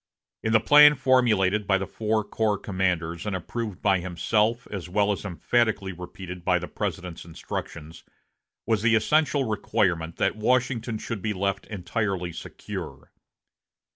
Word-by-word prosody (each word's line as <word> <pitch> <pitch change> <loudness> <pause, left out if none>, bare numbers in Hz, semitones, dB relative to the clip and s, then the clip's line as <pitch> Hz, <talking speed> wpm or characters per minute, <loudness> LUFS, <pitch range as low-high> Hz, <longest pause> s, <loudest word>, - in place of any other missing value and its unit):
In 110 - -1
the 115 - +6
plan 150 +4 +7
formulated 110 -7 +2
by 95 - +4
the 95 - -3
four 110 +2 -1
corps 105 0 0
commanders, 90 -3 -2
and 100 - -1
approved 105 +2 -5
by 95 -2 +3
himself, 105 +7 0
as 95 -4 -5
well 105 +2 +2
as 100 - -3
emphatically 100 +1 0
repeated 90 0 -9
by 90 +1 +3
the 90 0 -5
President's 90 -4 -5
instructions, 80 -1 -7 0.6
was 110 -2 +1
the 115 +1 +4
essential 145 +4 +2
requirement 100 -7 0
that - - 0
Washington 120 0 0
should 110 -1 -5
be 105 +1 -1
left 100 0 -2
entirely 95 -2 -2
secure. - - -8
105 Hz, 140 wpm, -25 LUFS, 90-110 Hz, 0.6 s, plan